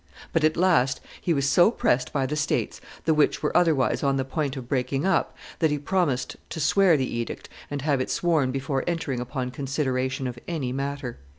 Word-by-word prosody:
But, 165 - +2
at 155 0 +3
last, 165 -8 +3 0.2
he 175 - 0
was 140 -3 +2
so 175 +7 +6
pressed 125 - +1
by 135 -2 0
the 145 +3 -2
states, 150 0 -1 0.2
the 160 - +4
which 150 0 +2
were 150 - -1
otherwise 160 -7 +3
on 140 -1 +1
the 135 - -1
point 140 0 -2
of 125 -2 -7
breaking 135 +3 -1
up, 190 -3 +1 0.2
that 160 - +3
he 150 - 0
promised 145 -4 -1
to - - -5
swear 170 +2 +4
the 130 -3 -2
edict 115 - -5 0.2
and 145 -2 -4
have 145 -3 +1
it - - -3
sworn 160 -6 +1
before 135 0 -2
entering 165 -7 -1
upon 125 0 -3
consideration 130 -1 -2
of 120 -1 -4
any 150 -8 -2
matter." 140 -1 -4
140 Hz, 200 wpm, -25 LUFS, 130-155 Hz, 0.2 s, so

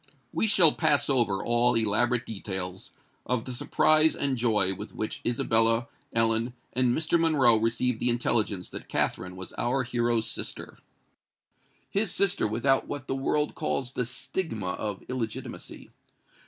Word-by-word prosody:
We 220 - +1
shall 180 -7 +6
pass 145 -1 +2
over 115 -7 +1
all 120 +1 +3
elaborate 115 +2 +1
details 95 -3 -5 0.3
of 125 -2 -2
the 130 - -5
surprise 155 +5 +3
and 140 -2 0
joy 110 -6 +1
with 105 +3 -9
which 110 - -4
Isabella, 115 0 +2 0.2
Ellen, 115 +1 +1 0.2
and 125 -1 +2
Mr. 165 +2 +1
Monroe 145 -8 +4
received 115 +2 0
the 125 - 0
intelligence 110 -5 0
that - - -9
Katherine 90 0 -1
was 95 0 -7
our 130 +2 0
hero's 120 -2 0
sister,—his 200 - -7
sister 200 - +2
without 125 +5 +1
what 145 -2 -5
the - - -3
world 150 +2 0
calls 135 -4 -2
the 125 - -1
stigma 115 - -3
of 105 +1 -5
illegitimacy! 120 -4 -6
120 Hz, 140 wpm, -27 LUFS, 110-135 Hz, 0.3 s, shall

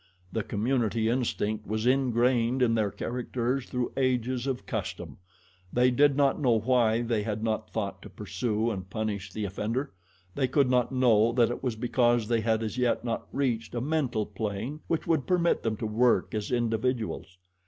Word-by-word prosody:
The 115 - -1
community 110 +1 0
instinct 110 -3 -1
was 110 +2 -2
ingrained 125 -1 +2
in 115 -2 +3
their 110 -3 +1
characters 125 +3 -2
through 125 -1 -2
ages 130 -1 0
of 130 -2 -3
custom. - - -5 0.5
They 125 +1 +3
did 140 +2 +4
not 140 0 +2
know 120 -5 +4
why 115 0 +2
they 115 -2 0
had 105 0 -3
not 110 -1 -1
thought 100 -3 -4
to 105 - -10
pursue 105 +4 -2
and 95 -3 -6
punish 105 -3 -3
the 105 +2 -3
offender 110 +7 -3 0.4
they 135 -2 +1
could 130 0 +2
not 125 0 +2
know 120 -4 +4
that 120 -1 +3
it - - -5
was 125 -4 -1
because 120 -1 +2
they 115 -2 +2
had 110 0 +1
as 110 +3 -3
yet 125 0 +1
not 115 -1 -3
reached 120 -4 -1
a - - 0
mental 135 -7 0
plane 105 +7 -4
which 165 - -1
would 160 -5 +1
permit 175 -2 +2
them 110 -2 -1
to 110 - -4
work 115 +3 +2
as 105 -2 -2
individuals. 115 -4 -1
120 Hz, 175 wpm, -28 LUFS, 110-125 Hz, 0.5 s, did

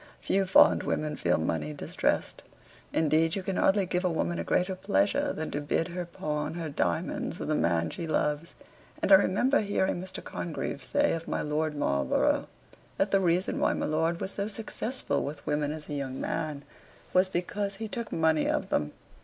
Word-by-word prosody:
Few 195 -1 +1
fond 185 - +6
women 150 -1 -1
feel 90 -8 +1
money 80 -1 -2
distressed; - - -1 0.5
indeed 160 +1 +2
you 195 - -3
can 190 0 -2
hardly 195 0 +3
give 180 0 -1
a 180 - +2
woman 85 - -1
a - - -1
greater 180 - +1
pleasure 100 - +1
than 160 0 -4
to 145 - -2
bid 165 +4 0
her 175 0 -4
pawn 150 -2 -3
her 165 -2 -4
diamonds 90 -11 -1
for - - -5
the - - 0
man 85 -1 +1
she 165 - -5
loves; 150 +1 -1 0.4
and - - 0
I - - +11
remember 205 +8 +5
hearing 195 -3 0
Mr. 185 0 -7
Congreve - - -4
say 290 0 +2
of 165 0 -4
my - - -1
Lord 150 +1 -1
Marlborough, 70 - +1 0.5
that 195 - +1
the 195 - +4
reason 180 0 +1
why - - +3
my - - -2
lord 160 +2 0
was 190 - -3
so 200 0 -2
successful 220 - -2
with 140 0 -6
women 150 0 0
as 155 -1 -6
a 150 - -5
young 135 -2 -3
man, 150 -3 -3 0.5
was 185 +1 +4
because 195 +3 -2
he 220 +2 -5
took 230 +1 -4
money 160 -1 +2
of - - -1
them. 75 0 0
160 Hz, 190 wpm, -29 LUFS, 145-190 Hz, 0.5 s, I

